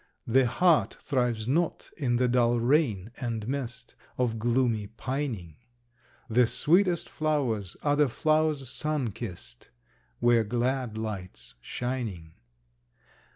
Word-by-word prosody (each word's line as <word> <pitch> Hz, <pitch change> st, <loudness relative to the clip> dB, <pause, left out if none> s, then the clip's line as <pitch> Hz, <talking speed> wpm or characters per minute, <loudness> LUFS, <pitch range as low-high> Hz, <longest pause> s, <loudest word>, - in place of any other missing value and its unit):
The 130 Hz, +2 st, +4 dB
heart 170 Hz, +5 st, +3 dB
thrives 120 Hz, -5 st, -1 dB
not 160 Hz, +6 st, 0 dB
in 130 Hz, -6 st, 0 dB
the 125 Hz, +1 st, +2 dB
dull 120 Hz, -1 st, +3 dB
rain 115 Hz, -, +1 dB
and 115 Hz, -3 st, -3 dB
mist 125 Hz, -2 st, -4 dB, 0.2 s
Of 115 Hz, -3 st, 0 dB
gloomy 115 Hz, -2 st, +1 dB
pining. 115 Hz, -, -4 dB, 0.7 s
The 120 Hz, 0 st, +4 dB
sweetest 175 Hz, -, +2 dB
flowers 130 Hz, -, -1 dB
are 145 Hz, -1 st, +3 dB
the 145 Hz, -2 st, +3 dB
flowers 155 Hz, +1 st, +1 dB
sun 145 Hz, -2 st, -1 dB
kissed, 70 Hz, -, -9 dB, 0.5 s
Where 120 Hz, -1 st, +4 dB
glad 120 Hz, +1 st, -1 dB
light's 95 Hz, -, -6 dB
shining. 110 Hz, -, -4 dB
120 Hz, 110 wpm, -28 LUFS, 110-140 Hz, 0.7 s, The